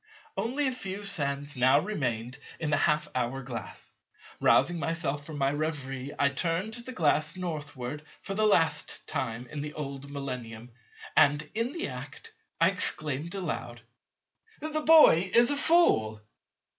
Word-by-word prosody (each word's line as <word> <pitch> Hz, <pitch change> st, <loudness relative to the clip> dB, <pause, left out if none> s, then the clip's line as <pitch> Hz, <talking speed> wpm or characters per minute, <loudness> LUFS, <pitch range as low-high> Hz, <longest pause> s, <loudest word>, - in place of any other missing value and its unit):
Only 245 Hz, +9 st, 0 dB
a -, -, 0 dB
few 200 Hz, -5 st, -5 dB
sands 145 Hz, -6 st, -1 dB
now 130 Hz, +3 st, +4 dB
remained 125 Hz, -, -3 dB, 0.2 s
in 160 Hz, -2 st, -2 dB
the -, -, +4 dB
half 150 Hz, 0 st, +1 dB
hour 130 Hz, +2 st, -2 dB
glass. 120 Hz, -3 st, -8 dB, 0.5 s
Rousing 175 Hz, 0 st, +3 dB
myself 150 Hz, -2 st, -2 dB
from 155 Hz, -2 st, -7 dB
my 135 Hz, -1 st, +1 dB
reverie 140 Hz, -3 st, -4 dB
I 140 Hz, -, +3 dB
turned 165 Hz, +9 st, -2 dB
the 240 Hz, +2 st, -7 dB
glass 155 Hz, -, +2 dB
Northward 150 Hz, -6 st, -5 dB, 0.2 s
for 195 Hz, -, -4 dB
the 215 Hz, +2 st, +2 dB
last 165 Hz, -6 st, +2 dB
time 115 Hz, +2 st, -3 dB
in 145 Hz, +4 st, -6 dB
the 150 Hz, +1 st, -6 dB
old 140 Hz, -2 st, -6 dB
Millennium; 125 Hz, -4 st, -6 dB, 0.4 s
and 145 Hz, +1 st, +4 dB
in 230 Hz, +4 st, -1 dB
the 340 Hz, +3 st, -3 dB
act, -, -, -9 dB, 0.3 s
I -, -, +5 dB
exclaimed 155 Hz, +4 st, -1 dB
aloud, 135 Hz, -10 st, -5 dB, 0.8 s
"The 310 Hz, 0 st, -1 dB
boy 300 Hz, -, +7 dB
is 240 Hz, +3 st, +7 dB
a -, -, +1 dB
fool." 280 Hz, -, +3 dB
150 Hz, 145 wpm, -28 LUFS, 135-195 Hz, 0.8 s, boy